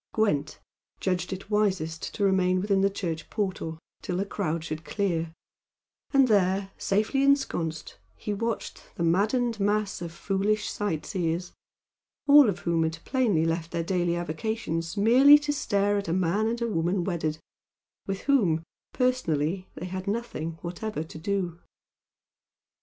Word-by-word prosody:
Gwent 150 -9 0 0.4
judged 180 -1 -1
it 195 +2 -7
wisest 185 -6 0
to 205 - -1
remain 185 -2 +3
within 195 0 +1
the 195 - +4
church 165 -5 -4
portal 190 -6 -3 0.2
till 180 - -3
the 195 - 0
crowd 170 -5 -2
should 155 0 -5
clear, 170 -5 -1 0.8
and 275 -2 +5
there, 195 -2 +2
safely 215 +7 +1
ensconced, 225 - 0 0.2
he 210 - -4
watched 230 +2 -3
the 170 - -2
maddened 215 +7 +1
mass 205 -1 0
of 170 -1 -5
foolish 200 +4 0
sight 190 -7 -2
seers, 175 -1 -2 0.7
all 285 -4 +8
of 195 - -3
whom 170 -1 +1
had 160 0 0
plainly 220 - +2
left 165 0 -1
their 170 - -2
daily 175 -1 0
avocations 170 0 -3
merely 255 +8 +8
to 295 0 -2
stare 205 -6 +1
at 200 - -6
a 165 - 0
man 185 +4 +1
and 235 +1 -2
woman 180 -4 0
wedded, 160 -4 -2 0.7
with 195 0 -3
whom, 190 - +2 0.3
personally, 185 - 0
they 180 - -6
had 185 +1 -5
nothing 200 -7 -3
whatever 175 0 -4
to 160 0 -10
do. 180 -1 -2
190 Hz, 145 wpm, -27 LUFS, 165-215 Hz, 0.8 s, all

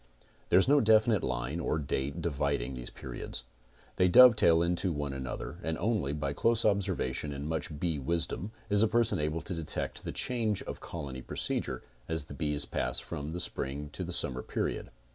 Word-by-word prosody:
There - - +6
is 95 - +5
no 145 +1 +5
definite 110 -1 +4
line 60 +6 -2
or 80 - 0
date 70 +2 -2
dividing 70 -5 -1
these 60 -1 -6
periods. - - -6 0.5
They 90 - +5
dovetail 90 -6 +7
into 90 +2 0
one 75 -3 -3
another 65 +5 -5
and 80 0 -2
only 100 -8 0
by 75 -1 -2
close 115 +8 +2
observance 95 -10 +1
and 70 -1 -4
much 80 -1 -3
bee 80 -3 0
wisdom 85 +7 -1 0.2
is 105 0 +3
a 110 - +5
person 115 -3 +2
able 75 +2 -1
to 95 - -4
detect 80 -3 -3
the - - -4
change 115 -5 +1
of - - -6
colony 70 -6 -6
procedure 65 0 -2 0.3
as 80 -2 -1
the 70 - -10
bees 75 -1 0
pass - - 0
from 75 +2 -5
the 90 - -4
spring 75 -3 -4
to - - -4
the - - -5
summer 65 -1 -1
period. - - -3
80 Hz, 180 wpm, -31 LUFS, 70-95 Hz, 0.5 s, dovetail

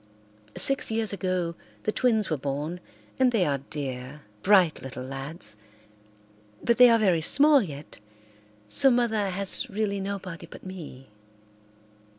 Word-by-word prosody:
Six 275 0 +2
years 220 -2 -2
ago 185 -3 -2 0.3
the 215 - 0
twins 220 -6 0
were - - +2
born, 145 +5 -4 0.4
and 260 -1 +4
they 215 -7 +1
are 140 -3 -1
dear, 135 0 -6 0.2
bright 185 -5 +3
little 130 -1 -8
lads, 135 -4 -7 1.1
but 235 0 +1
they 250 -1 +9
are 230 - +5
very 185 -7 +2
small 285 - +5
yet, 145 - -9 0.7
so 185 - +4
Mother 225 -5 +1
has 195 +1 +4
really 205 -1 -2
nobody 195 -3 -6
but - - -14
me. 155 -8 -10
185 Hz, 135 wpm, -26 LUFS, 145-220 Hz, 1.1 s, they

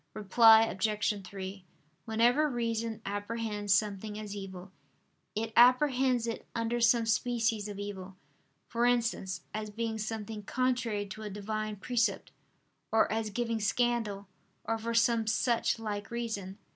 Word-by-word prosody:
Reply 220 +2 +7
Obj. 210 -1 -1
3: 190 0 -7 0.4
Whenever 240 +7 +3
reason 230 -2 -2
apprehends 205 0 -3
something 210 +1 +1
as 210 -1 -6
evil, 190 -2 -8 0.6
it 225 +1 -2
apprehends 255 0 +5
it 230 -1 -5
under 230 +1 -1
some 230 0 +4
species 225 -2 0
of 205 -1 -7
evil; 195 -2 -6 0.5
for 235 0 +1
instance, 230 -6 0
as 215 0 -4
being 220 +1 -3
something 215 0 -4
contrary 240 -2 -1
to 205 +2 -9
a 215 - -5
divine 215 +1 -4
precept, 235 +3 -1 0.6
or 220 0 +3
as 220 0 -1
giving 230 +1 -2
scandal, 215 -2 0 0.4
or 225 0 -1
for 230 +1 -3
some 230 -1 +3
such 235 +2 +1
like 210 -2 -4
reason. 220 -5 -4
220 Hz, 130 wpm, -31 LUFS, 205-235 Hz, 0.6 s, Reply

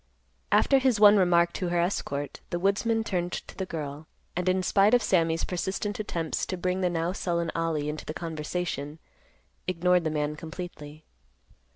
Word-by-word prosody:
After 275 - +5
his 260 -5 +2
one 210 0 +8
remark 175 -2 +4
to 180 - -2
her 175 0 +1
escort, 145 -5 -2
the 175 - -1
woodsman 210 +5 +1
turned 180 -4 -2
to - - -6
the 190 - -4
girl, 150 -2 -6 0.3
and, 180 +1 0
in 185 0 +1
spite 200 +5 +4
of 245 - +2
Sammy's 165 -5 +2
persistent 190 +3 -2
attempts 170 -6 -2
to 185 - -3
bring 180 +1 -1
the 180 - +2
now 170 0 -1
sullen 170 -3 -1
Ollie 165 -3 -1
into 150 +1 -4
the 155 - -4
conversation, 160 -2 -4 0.7
ignored 180 0 +2
the 160 - 0
man 150 -1 -1
completely. 160 -2 -8
175 Hz, 170 wpm, -27 LUFS, 160-190 Hz, 0.7 s, one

